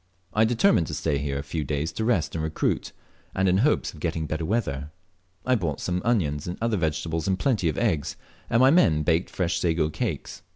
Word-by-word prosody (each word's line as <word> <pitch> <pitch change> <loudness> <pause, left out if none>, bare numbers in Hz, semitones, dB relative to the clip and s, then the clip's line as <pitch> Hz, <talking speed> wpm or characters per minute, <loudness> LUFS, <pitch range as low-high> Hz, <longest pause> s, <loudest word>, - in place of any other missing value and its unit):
I 110 +1 +4
determined 115 - +3
to - - -4
stay 70 - 0
here 70 -1 -2
a 70 - -4
few 75 +2 -3
days 75 +3 -2
to 110 - -3
rest 95 -11 +1
and 80 - -2
recruit, 80 0 -1 0.4
and 95 0 +2
in 90 0 +4
hopes 145 +7 +2
of 80 - -12
getting 80 0 -2
better 80 +2 -3
weather. 75 - -1 0.6
I 130 - +3
bought 85 - -1
some 90 0 -2
onions 80 -12 0
and 90 - -4
other 115 -1 0
vegetables, 80 0 -1
and 95 -1 +1
plenty 105 -6 +1
of 75 - -3
eggs, 85 - 0 0.3
and 115 - +3
my 130 +1 +7
men 80 - +4
baked 80 +3 +1
fresh 85 -2 -1
sago 80 -2 +1
cakes. - - -4
85 Hz, 210 wpm, -25 LUFS, 75-105 Hz, 0.6 s, my